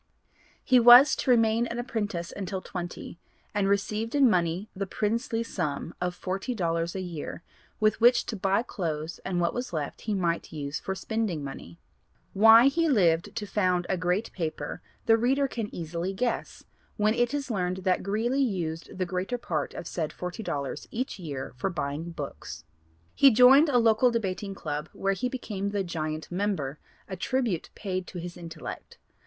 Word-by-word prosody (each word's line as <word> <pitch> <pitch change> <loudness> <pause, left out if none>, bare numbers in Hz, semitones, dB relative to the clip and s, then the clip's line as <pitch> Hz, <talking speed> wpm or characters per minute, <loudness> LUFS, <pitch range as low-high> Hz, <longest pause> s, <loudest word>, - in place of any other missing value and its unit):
He 255 -1 +5
was 245 +4 +9
to - - -2
remain 230 -1 +4
an 235 - -5
apprentice 210 -7 -3
until 190 -1 -3
twenty, 175 -2 -7 0.3
and 200 -1 +1
received 210 +4 -1
in 280 -2 +6
money 175 +2 0
the 195 +1 -3
princely 225 +3 -1
sum 165 -7 -3
of 180 0 -1
forty 195 +8 -3
dollars 170 -3 -1
a 190 - -2
year 170 -2 -6 0.4
'with 215 +1 +2
which 240 +1 +5
to 225 - -4
buy 195 +2 +1
clothes 160 -7 -4
and 180 -2 -1
what 170 -1 +1
was 245 -5 -4
left 150 -3 -4
he 215 -2 -2
might 170 -3 -1
use 145 -2 -4
for 190 - -4
spending 195 -6 -2
money.' 85 -11 -8 0.6
Why 225 +4 +8
he 325 +4 +3
lived 170 - +2
to 210 - -3
found 185 -3 +1
a 190 - +2
great 180 +5 -1
paper 165 -4 -4 0.2
the 225 0 +5
reader 270 +4 +2
can 230 -5 -4
easily 170 +3 -4
guess, 235 +5 -2 0.3
when 210 +1 +3
it 240 0 +1
is 285 -3 -3
learned 185 -2 -2
that 185 -1 +2
Greeley 225 +8 0
used 170 -11 -2
the 185 - 0
greater 185 +7 -2
part 155 -10 -3
of - - -6
said 155 -2 -3
forty 180 +5 -6
dollars 140 -9 -4
each 245 -2 -4
year 140 -8 -6
for 160 - -1
buying 155 -1 -3
books. 150 -4 -7 0.5
He 275 - +7
joined 260 +6 +7
a 255 - +3
local 230 +1 +4
debating 200 -3 -2
club 150 -2 -4
where 195 0 0
he 250 +6 -2
became 210 -6 -4
the 200 -1 -1
'giant' 155 -3 -4
member, 175 -7 -2 0.3
a 190 - -5
tribute 225 -2 -1
paid 185 -3 -3
to - - -8
his 175 0 -6
intellect. 165 -2 -8
190 Hz, 175 wpm, -27 LUFS, 170-230 Hz, 0.6 s, was